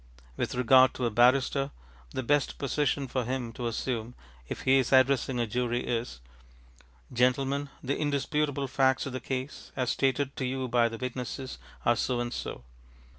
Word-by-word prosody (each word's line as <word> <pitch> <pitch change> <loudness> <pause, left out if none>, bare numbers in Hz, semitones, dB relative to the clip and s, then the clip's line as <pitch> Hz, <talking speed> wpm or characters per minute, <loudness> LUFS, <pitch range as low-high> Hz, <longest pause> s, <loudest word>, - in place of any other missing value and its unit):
With - - -2
regard 130 +1 +5
to 125 - -1
a 115 - 0
barrister, 130 +4 +3 0.4
the 130 - -4
best 145 +2 +1
position 140 0 0
for 130 0 -1
him 125 -1 -3
to 120 0 -3
assume, 115 0 -3 0.3
if - - -4
he 135 +1 +4
is 130 - -1
addressing 130 -1 +3
a 120 - +2
jury, 120 +1 -1
is, 115 - -3 0.9
ŌĆ£Gentlemen, 135 +3 +1
the 140 +2 0
indisputable 145 -1 0
facts 130 0 +2
of 135 - -5
the 130 - -3
case, 130 +2 -5
as 130 -3 0
stated 135 0 0
to 130 - -1
you 130 0 -2
by 120 -1 +3
the 115 - -6
witnesses, 130 +1 -5 0.3
are 120 - +4
so 120 +2 0
and 120 0 -2
so. 60 - -5
130 Hz, 170 wpm, -29 LUFS, 120-135 Hz, 0.9 s, regard